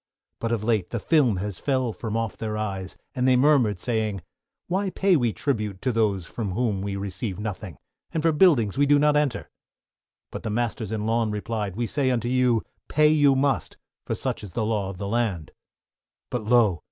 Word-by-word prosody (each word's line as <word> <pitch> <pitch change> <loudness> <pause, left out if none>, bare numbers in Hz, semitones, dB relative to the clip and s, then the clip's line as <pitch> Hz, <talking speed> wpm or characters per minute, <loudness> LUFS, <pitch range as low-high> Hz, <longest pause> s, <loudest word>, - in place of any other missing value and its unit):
But 115 - -2
of 115 -3 -1
late, 110 -5 +1
the 120 - -3
film 130 - +3
has 100 0 -4
fell 130 -5 0
from 110 0 -4
off 115 -2 -2
their 110 -1 -4
eyes, 95 -3 -4 0.2
and 130 -2 0
they 130 - +5
murmured 125 -7 +3
saying, 110 -4 -2 0.4
why 190 +2 -1
pay 190 0 +2
we 120 -7 +2
tribute 105 -2 -2
to 130 - +1
those 105 -6 +1
from 100 0 -4
whom 110 -3 0
we 100 0 -3
receive 100 0 -4
nothing, 105 -3 -5 0.3
and 160 - -2
for 165 - +4
buildings 145 - +3
we 145 - +4
do 145 0 +5
not 150 +1 +3
enter? 150 -4 0 0.8
But - - -6
the 110 - -4
masters 110 -1 -2
in 110 -1 -2
lawn, 115 0 +1
replied, 105 -2 -3
we 120 +2 -1
say 135 +3 +1
unto 120 -2 0
you, 125 -3 +2 0.2
pay 155 0 +4
you 145 -3 +4
must, 135 0 0 0.3
for - - -2
such - - -3
is 95 -4 -9
the 110 - -1
law 105 -3 -1
of 95 - -7
the 100 +2 -4
land. 105 -8 -1 0.8
But 120 -4 -3
lo! 110 -6 +4
115 Hz, 200 wpm, -25 LUFS, 105-130 Hz, 0.8 s, they